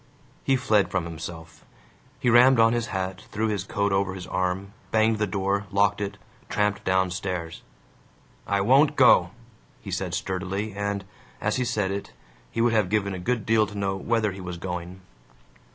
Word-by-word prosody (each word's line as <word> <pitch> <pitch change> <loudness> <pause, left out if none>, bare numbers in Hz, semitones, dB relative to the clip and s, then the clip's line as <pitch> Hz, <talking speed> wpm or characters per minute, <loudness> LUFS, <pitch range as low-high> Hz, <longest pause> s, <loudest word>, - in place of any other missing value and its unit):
He 135 - +3
fled 110 -5 +2
from 90 -2 -1
himself. 80 -1 -8 0.6
He 120 - +2
rammed 125 +1 +6
on 115 0 +5
his 120 -1 -1
hat, 95 -2 -3
threw 110 +1 0
his 100 -3 -1
coat 100 0 -1
over 95 -1 0
his 90 -2 -7
arm, 95 +2 -2 0.2
banged 110 0 +2
the 105 - +1
door, 100 +1 -1
locked 100 +1 +2
it, 100 0 -3 0.3
tramped 105 -1 0
downstairs. 95 -2 -1 0.9
"I 100 0 +1
won't 140 +7 +4
go!" 105 -10 +6 0.5
he - - -8
said - - -2
sturdily 95 +3 -3
and, 100 -1 -3 0.3
as - - 0
he 125 - 0
said 105 -4 0
it, 100 0 -5 0.4
he 115 - -2
would 120 0 +3
have 105 -5 +2
given 100 -1 0
a 95 - -5
good 115 +3 -1
deal 110 -1 +3
to 105 - -9
know 100 -1 -1
whether 110 +1 0
he 95 0 -8
was 90 -1 -6
going. 90 +1 -6
100 Hz, 175 wpm, -25 LUFS, 95-110 Hz, 0.9 s, rammed